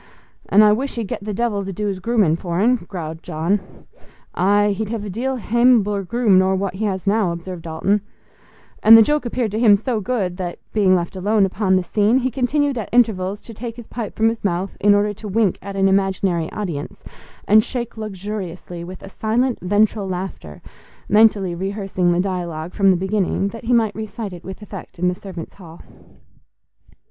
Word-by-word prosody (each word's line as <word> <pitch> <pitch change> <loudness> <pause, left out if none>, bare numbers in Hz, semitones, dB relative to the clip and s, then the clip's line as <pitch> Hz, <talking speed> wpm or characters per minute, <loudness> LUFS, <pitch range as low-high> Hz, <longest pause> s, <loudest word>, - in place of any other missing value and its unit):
"An' 210 +2 +6
I 210 0 +6
wish 270 +5 -2
he'd 230 -4 -3
get 200 - -5
the 210 - -4
devil 210 -1 -1
to 195 - -5
do's 200 0 -3
grooming 205 -6 +2
for'n," 185 +9 +1
growled 160 -4 -6
John. 180 +4 -3 0.5
"Aye; 205 +3 +3
he'd 215 +1 -3
hev 220 -2 -4
a 200 - -5
deal 260 +7 -2
haimabler 230 -3 +3
groom 225 -3 +3
nor 190 0 +2
what 190 -1 -2
he 210 +3 -3
has 190 -2 -2
now," 205 -3 +2
observed 170 +1 -6
Dalton—and 205 +5 +1
the 225 - +8
joke 295 0 0
appeared 235 -3 -2
to 215 - -2
him 220 -4 +6
so 225 +2 -2
good 195 -6 -2
that, 180 -2 -4 0.2
being 195 -4 +4
left 175 +2 -2
alone 200 +2 +2
upon 190 0 +1
the 185 - +2
scene, 210 +6 +2
he 260 0 0
continued 275 +1 0
at 215 - -5
intervals 205 -5 +2
to 230 - -11
take 230 +1 -7
his 240 -1 -10
pipe 225 -3 -6
from 220 - +2
his 225 0 -5
mouth 185 0 -2
in 205 0 +5
order 205 +1 +1
to 210 +2 -9
wink 205 -1 +1
at 195 +1 -7
an 195 0 +3
imaginary 190 -3 +1
audience 170 -9 -5 0.4
and 215 +1 +6
shake 240 -1 -5
luxuriously 190 -4 -6
with 185 +2 -9
a - - -8
silent, 230 +5 0
ventral 205 +2 +1
laughter, 180 - -6 0.5
mentally 210 -3 +4
rehearsing 190 -1 -1
the 175 - +1
dialogue 175 -3 -3
from 195 -1 +3
the 185 - +4
beginning, 195 +1 0
that 230 +2 -10
he 240 - -1
might 225 -3 +3
recite 215 -1 -6
it 175 0 -10
with 190 +2 -9
effect 200 -3 -10
in 180 +1 +1
the - - -1
servants' 180 -3 -9
hall. 170 -3 -12
200 Hz, 190 wpm, -20 LUFS, 185-220 Hz, 0.5 s, the